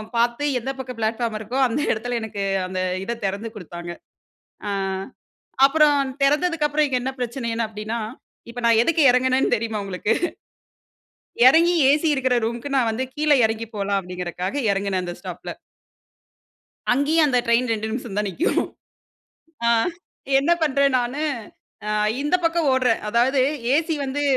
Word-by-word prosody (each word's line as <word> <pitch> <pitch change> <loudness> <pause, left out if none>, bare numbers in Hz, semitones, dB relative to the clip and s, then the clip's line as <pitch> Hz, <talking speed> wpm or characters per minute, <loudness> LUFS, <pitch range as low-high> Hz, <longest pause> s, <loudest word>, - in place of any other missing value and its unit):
பாத்து 235 +4 +1
எந்த 255 - -5
பக்கம் 250 -2 -6
பிளாட்ஃபார்ம் 225 0 -1
இருக்கோ, 220 +5 -5
அந்த 245 +5 -2
எடத்துல 240 +2 -3
எனக்கு 210 -2 -4 0.2
அந்த 185 0 -4 0.3
இத 235 +2 -3
தெறந்து 200 +4 -3
குடுத்தாங்க. 175 -3 -8 0.8
ஆ - - -1 1.0
அப்புறம் 295 0 +4 0.3
தெறந்ததுக்கப்புறம் 300 0 +2
இங்க 255 -2 +1
என்ன 265 +1 -2
பிரச்சனைன்னு 235 -2 -2
அப்படின்னா, 215 +2 -5 0.5
இப்ப 245 +1 -6
நான் 230 -1 +5
எதுக்கு 330 -1 +2
எறங்குனேன்னு 255 0 +2
தெரியுமா 225 -1 -3
உங்களுக்கு. 195 +3 -1 1.3
எறங்கி 335 +6 +6 0.2
ஏசி 295 +3 +2
இருக்கிற 260 -2 +1
ரூம்க்கு 235 +4 -3
நான் 245 -4 +2
வந்து 230 +4 -2
கீழ 300 0 0
எறங்கி 225 +1 -1
போலாம் 200 -1 0
அப்படிங்கறக்காக 180 +6 -4
எறங்குனேன் 195 -1 -1
அந்த 175 -1 -5
ஸ்டாப்ல. - - -7 1.4
அங்கேயும், 300 +5 +3
அந்த 250 -2 +2
ட்ரெயின் 235 +1 +2
ரெண்டு 220 0 -2
நிமிஷம் 235 -3 -5
தான் 210 -1 0
நிக்கும். 335 - 0 1.1
ஆ - - +4 0.7
என்ன 290 +5 +2
பண்றேன்? 280 -2 +2
நானு, 250 +5 -2 0.7
அ - - -1 0.3
இந்த 295 +5 0
பக்கம் 330 -2 +2
ஓடுறேன். 255 -3 +2
அதாவது 245 +5 +2 0.3
ஏசி 320 +1 +1
வந்து 275 +2 -2
240 Hz, 140 wpm, -22 LUFS, 220-280 Hz, 1.4 s, எறங்கி